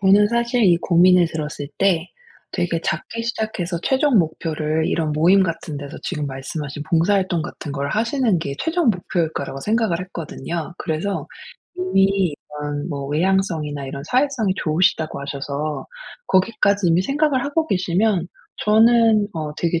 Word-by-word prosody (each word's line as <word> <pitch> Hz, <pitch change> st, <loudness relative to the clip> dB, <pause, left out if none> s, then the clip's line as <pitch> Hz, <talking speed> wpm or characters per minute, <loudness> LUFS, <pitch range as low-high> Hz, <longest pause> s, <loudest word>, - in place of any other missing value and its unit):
저는 200 Hz, +1 st, +5 dB
사실 235 Hz, +1 st, +1 dB
이 175 Hz, -3 st, +5 dB
고민을 180 Hz, 0 st, +5 dB
들었을 150 Hz, -3 st, -5 dB
때 180 Hz, -3 st, +2 dB, 0.4 s
되게 175 Hz, -2 st, -1 dB
작게 230 Hz, +8 st, -3 dB
시작해서 215 Hz, -7 st, -3 dB
최종 265 Hz, -2 st, +3 dB
목표를 160 Hz, -1 st, -1 dB
이런 155 Hz, -3 st, 0 dB
모임 175 Hz, +6 st, +5 dB
같은 165 Hz, -4 st, -3 dB
데서 140 Hz, +1 st, -7 dB
지금 150 Hz, -5 st, -3 dB
말씀하신 140 Hz, +2 st, -5 dB
봉사 170 Hz, +5 st, +3 dB
활동 185 Hz, -4 st, 0 dB
같은 145 Hz, -1 st, -7 dB
걸 140 Hz, 0 st, -2 dB
하시는 230 Hz, -2 st, +1 dB
게 140 Hz, -4 st, -4 dB
최종 325 Hz, -5 st, +2 dB
목표일 175 Hz, -4 st, -1 dB
거라고 135 Hz, -1 st, -5 dB
생각을 215 Hz, -4 st, 0 dB
했거든요. 170 Hz, -2 st, -5 dB
그래서 170 Hz, +4 st, -2 dB, 0.5 s
이미 195 Hz, -, +2 dB, 0.3 s
이런 145 Hz, +1 st, -3 dB
뭐 140 Hz, -4 st, -4 dB
외향성이나 155 Hz, -3 st, 0 dB
이런 140 Hz, +1 st, -6 dB
사회성이 250 Hz, -, +1 dB
좋으시다고 160 Hz, -2 st, +1 dB
하셔서 140 Hz, +2 st, -4 dB, 0.4 s
거기까지 200 Hz, 0 st, +2 dB
이미 170 Hz, +2 st, +3 dB
생각을 275 Hz, +2 st, +1 dB
하고 315 Hz, +3 st, 0 dB
계시면 185 Hz, -, +1 dB, 0.3 s
저는 220 Hz, 0 st, +4 dB
어 155 Hz, -3 st, -4 dB
되게 170 Hz, -1 st, 0 dB
175 Hz, 335 characters per minute, -21 LUFS, 155-210 Hz, 0.5 s, 저는